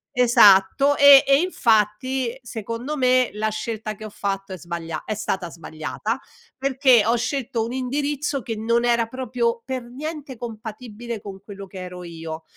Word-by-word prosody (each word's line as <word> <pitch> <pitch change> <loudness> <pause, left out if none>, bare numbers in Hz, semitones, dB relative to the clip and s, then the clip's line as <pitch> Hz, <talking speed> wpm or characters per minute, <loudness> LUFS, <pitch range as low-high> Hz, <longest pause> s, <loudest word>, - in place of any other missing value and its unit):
esatto 245 +3 +5
e 280 -1 +9
e 275 0 +5
infatti, 240 - +1
secondo 230 +5 -5
me, 255 -2 +3
la 215 +1 -1
scelta 215 0 -4
che 215 - -10
ho - - -6
fatto 195 -1 -4
è - - -6
sbaglia 165 -2 -5
è 215 - -3
stata 190 -4 -3
sbagliata, 165 +8 -5 0.4
perché 265 -3 +4
ho 230 +3 +2
scelto 235 -2 -2
un 235 - -5
indirizzo 280 +1 -2
che 225 +2 -4
non 235 +2 +1
era 235 -1 +2
proprio 235 -1 -2
per 260 -1 -3
niente 280 +2 -7
compatibile 225 0 -7
con 195 -1 -10
quello 200 -1 -9
che 190 0 -10
ero 180 0 -8
io. 165 -1 -7
230 Hz, 160 wpm, -23 LUFS, 205-255 Hz, 0.4 s, e